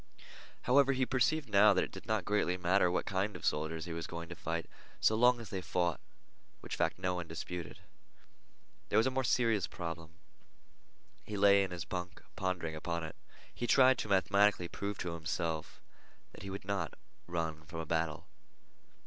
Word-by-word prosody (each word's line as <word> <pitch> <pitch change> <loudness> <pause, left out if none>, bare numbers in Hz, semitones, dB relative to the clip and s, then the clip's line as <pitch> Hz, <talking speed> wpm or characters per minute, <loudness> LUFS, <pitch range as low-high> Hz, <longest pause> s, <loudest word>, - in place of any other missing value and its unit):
However, 135 +2 +5
he 130 0 +1
perceived 135 +4 +1
now 105 0 +6
that - - +3
it - - -5
did - - -10
not 110 -4 0
greatly 100 -3 +1
matter 90 +1 +3
what 90 - 0
kind 100 +2 -1
of - - -7
soldiers 80 +2 -1
he 85 - -5
was 85 0 -4
going 85 0 -7
to 90 - -7
fight, 85 +1 -3 0.3
so - - +4
long 120 +2 +5
as 115 -3 -8
they 95 - -3
fought, 90 -2 0 0.6
which - - -6
fact - - 0
no 90 0 -1
one 90 -2 -4
disputed. 80 -2 -6 1.1
There 105 - +2
was 110 - +5
a 130 - +2
more 130 0 0
serious 115 -5 +2
problem. 80 -2 -6 1.1
He 105 - -5
lay 100 0 +6
in 95 - -3
his 90 -2 -5
bunk 90 -1 -5
pondering 90 -4 -2
upon 85 +1 -3
it. 80 - -6 0.4
He 120 - -3
tried 130 +1 +6
to 105 - -3
mathematically 100 -1 +3
prove 100 +3 -4
to 90 -2 -3
himself 80 -1 -3 0.5
that - - -12
he 100 - -6
would 95 0 -6
not 100 0 -2 0.3
run 80 -3 -3
from 80 - -7
a 80 - -3
battle. 80 -1 -1
90 Hz, 185 wpm, -33 LUFS, 85-105 Hz, 1.1 s, now